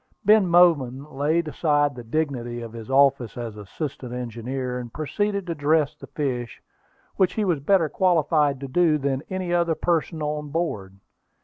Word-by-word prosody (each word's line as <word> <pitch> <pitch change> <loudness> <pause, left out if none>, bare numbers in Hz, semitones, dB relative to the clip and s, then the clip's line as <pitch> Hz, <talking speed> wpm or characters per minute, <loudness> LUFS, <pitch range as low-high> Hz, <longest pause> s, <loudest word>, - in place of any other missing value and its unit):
Ben 210 -2 +5
Bowman 145 -7 +4
laid 155 +4 +1
aside 145 -1 +1
the 125 -2 -9
dignity 120 -2 -2
of 115 -1 -8
his 115 +1 -9
office 135 -4 +3
as 115 -3 -5
assistant 125 - -6
engineer, 125 +1 -4
and 120 -2 -8
proceeded 200 - -2
to 170 - -2
dress 150 0 +1
the - - -12
fish, 125 -6 -3 0.6
which 190 -2 +3
he 215 - 0
was 170 -6 +1
better 165 +3 +3
qualified 150 -5 +2
to 135 - -5
do 160 +2 +3
than 135 -2 -1
any 185 -2 -2
other 170 -2 +2
person 165 -2 -1
on 150 0 -3
board. 110 - -3
145 Hz, 165 wpm, -24 LUFS, 125-170 Hz, 0.6 s, Ben